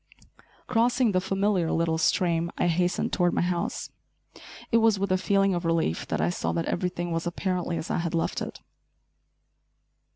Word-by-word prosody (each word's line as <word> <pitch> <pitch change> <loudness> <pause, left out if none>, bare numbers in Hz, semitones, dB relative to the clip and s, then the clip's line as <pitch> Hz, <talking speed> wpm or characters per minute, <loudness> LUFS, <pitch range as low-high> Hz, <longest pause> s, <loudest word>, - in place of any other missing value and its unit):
Crossing 240 0 +2
the 185 -1 +1
familiar 195 -2 0
little 165 -1 +1
stream, 170 -1 +1
I - - +1
hastened 175 +1 0
toward 175 -1 +2
my - - +2
house. 175 -1 -2 0.8
It 230 - +5
was 225 -2 +4
with 200 0 -1
a - - +4
feeling 195 0 +2
of 175 0 -2
relief 165 - 0
that - - -2
I 85 +3 +1
saw 80 -1 -2
that 85 - -1
everything 175 -1 -2
was 165 +1 -2
apparently 180 -1 -2
as - - -4
I - - 0
had 170 -1 -2
left 165 - -1
it. - - -6
175 Hz, 170 wpm, -26 LUFS, 165-195 Hz, 0.8 s, It